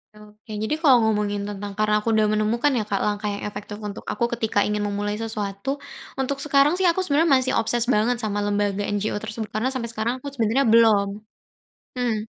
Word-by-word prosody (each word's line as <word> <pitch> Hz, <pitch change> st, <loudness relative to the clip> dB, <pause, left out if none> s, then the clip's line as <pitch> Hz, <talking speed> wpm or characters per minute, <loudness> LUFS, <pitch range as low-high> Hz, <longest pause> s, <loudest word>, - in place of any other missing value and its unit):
Oke, 210 Hz, +1 st, -16 dB
jadi 220 Hz, +8 st, -1 dB
kalau 300 Hz, -5 st, +5 dB
ngomongin 205 Hz, -1 st, -1 dB
tentang 205 Hz, 0 st, -6 dB
karena 210 Hz, +1 st, +1 dB
aku 230 Hz, -, 0 dB
udah 215 Hz, -1 st, +3 dB
menemukan 215 Hz, +5 st, +1 dB
ya, 225 Hz, -, 0 dB
Kak, 200 Hz, -1 st, -2 dB
langkah 210 Hz, 0 st, -1 dB
yang 200 Hz, -, -6 dB
efektif 205 Hz, +1 st, -8 dB
untuk 210 Hz, 0 st, -7 dB
aku 235 Hz, -1 st, -1 dB
ketika 220 Hz, -3 st, 0 dB
ingin 210 Hz, 0 st, -1 dB
memulai 205 Hz, 0 st, -2 dB
sesuatu, 220 Hz, +4 st, -3 dB, 0.4 s
untuk 265 Hz, +1 st, 0 dB
sekarang 285 Hz, +2 st, +3 dB
sih 380 Hz, -, -1 dB
aku 350 Hz, +1 st, +3 dB
sebenarnya 320 Hz, -3 st, +2 dB
masih 260 Hz, 0 st, +3 dB
obsess 235 Hz, +1 st, +2 dB
banget 235 Hz, 0 st, +2 dB
sama 205 Hz, -2 st, -2 dB
lembaga 205 Hz, 0 st, 0 dB
NGO 205 Hz, +1 st, -1 dB
tersebut 220 Hz, 0 st, -4 dB
karena 250 Hz, +5 st, 0 dB
sampai 245 Hz, -3 st, -3 dB
sekarang 230 Hz, +3 st, -2 dB
aku 280 Hz, -, -9 dB
sebenarnya 235 Hz, +3 st, +1 dB
belum. 220 Hz, -3 st, +5 dB, 0.9 s
Mmm. 245 Hz, -3 st, -1 dB
220 Hz, 190 wpm, -23 LUFS, 205-245 Hz, 0.9 s, kalau